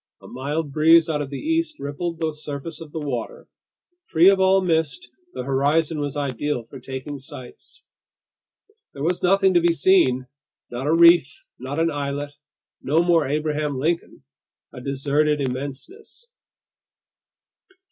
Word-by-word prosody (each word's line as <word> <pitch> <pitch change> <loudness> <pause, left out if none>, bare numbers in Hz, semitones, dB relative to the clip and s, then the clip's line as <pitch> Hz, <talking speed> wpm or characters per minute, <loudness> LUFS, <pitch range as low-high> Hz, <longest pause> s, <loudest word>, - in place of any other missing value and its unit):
A - - -11
mild 145 +4 -4
breeze 165 +2 +5
out 150 -1 -1
of 140 - -5
the 140 - -5
east 325 0 -1
rippled 165 +4 -4
the 160 -2 -1
surface 150 +1 -7
of 155 -2 -10
the - - -6
water. 130 -6 -5 0.6
Free 175 +3 +5
of 195 - +1
all 190 0 +4
mist, 160 -8 -1 0.2
the 130 - -4
horizon 145 +4 +1
was 145 0 -3
ideal 140 -1 -2
for 130 +4 -12
taking 135 +3 -7
sights. 130 - -11 1.1
There 140 - -6
was 175 +3 0
nothing 190 +1 +3
to 175 - +4
be 170 0 +3
seen. 140 -7 +3 0.5
Not 125 +3 -4
a - - +2
reef, 170 -2 +5
not 135 +5 -4
an 165 0 +2
islet. 145 0 -4 0.5
No 160 +5 +2
more 170 -4 +3
Abraham 150 -1 -1
Lincoln. 165 +1 -2 0.5
A 125 - -9
deserted 145 +3 0
immenseness. 140 - -6
150 Hz, 145 wpm, -22 LUFS, 140-165 Hz, 1.1 s, breeze